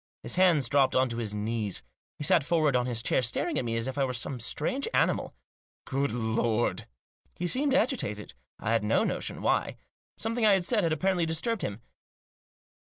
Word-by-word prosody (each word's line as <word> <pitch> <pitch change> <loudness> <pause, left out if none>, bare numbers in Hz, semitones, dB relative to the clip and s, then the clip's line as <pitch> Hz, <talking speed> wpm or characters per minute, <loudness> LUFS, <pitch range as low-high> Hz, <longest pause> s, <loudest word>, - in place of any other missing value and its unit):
His - - -2
hands 175 -8 +4
dropped 135 0 +3
on 130 0 +3
to 115 - -5
his 110 -3 -3
knees. 105 -2 -2 0.3
He - - -5
sat 150 +1 +4
forward 155 -3 +2
on 125 0 +1
his 120 -2 -1
chair, - - +2
staring 120 -1 0
at 125 - -3
me 115 -1 -1
as 115 - -1
if 130 +2 -4
I - - +3
were 130 -1 -1
some 125 +2 -3
strange 260 - -2
animal. - - +1
rt - - -51
Good 140 +1 0
Lord 115 0 0
I" - - -17 0.5
He 175 - -3
seemed 270 +8 +1
agitated. 105 - 0 0.2
I 115 - -2
had 115 -2 +2
no 105 +2 +2
notion - - -3
why. - - +1 0.4
Some 225 +1 -1
thing 240 -1 -1
I 210 -2 +6
had 190 -2 +1
said 225 0 +2
had 165 -3 0
apparently 175 +2 +1
disturbed 185 +8 -1
him. 100 +3 -5
135 Hz, 205 wpm, -28 LUFS, 115-175 Hz, 0.5 s, I